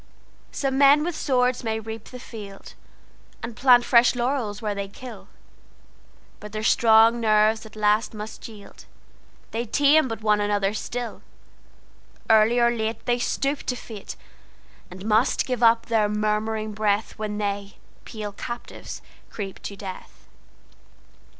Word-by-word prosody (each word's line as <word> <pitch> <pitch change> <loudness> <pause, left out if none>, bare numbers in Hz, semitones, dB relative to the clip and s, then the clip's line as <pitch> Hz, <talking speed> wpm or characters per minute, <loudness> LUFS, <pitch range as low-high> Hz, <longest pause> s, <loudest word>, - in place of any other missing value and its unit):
Some 270 -1 -1
men 285 +2 +6
with 345 0 -3
swords 250 -4 +1
may 220 -1 -1
reap 220 0 -8
the 250 - -10
field, 205 -5 -10 0.7
And 230 0 -5
plant 245 -1 +5
fresh 240 0 +5
laurels 240 -4 -1
where 210 -2 -2
they 200 0 -4
kill; 250 +5 -11 1.1
But 210 0 -10
their 215 0 -4
strong 225 +1 +5
nerves 220 0 +3
at 220 - -17
last 215 +1 +1
must 215 +1 -7
yield—They 225 +2 -11
tame 290 +4 +4
but 225 -3 -6
one 210 -1 +3
another 205 -1 0
still:Early 225 -1 -3
or 235 0 +4
lateThey 230 +1 -2
stoop 275 +3 -1
to 250 - 0
fate, 220 -4 -9 0.7
And 185 +2 -10
must 220 +3 +2
give 250 -2 -3
up 230 0 +5
their 220 -3 +1
murmuring 215 +1 -1
breathWhen 210 0 -1
they, 200 -1 -3 0.3
pale 210 -2 -6
captives, 240 +4 -8 0.3
creep 195 -3 -6
to 200 - -6
death. 190 -2 -10
220 Hz, 130 wpm, -24 LUFS, 210-240 Hz, 1.1 s, men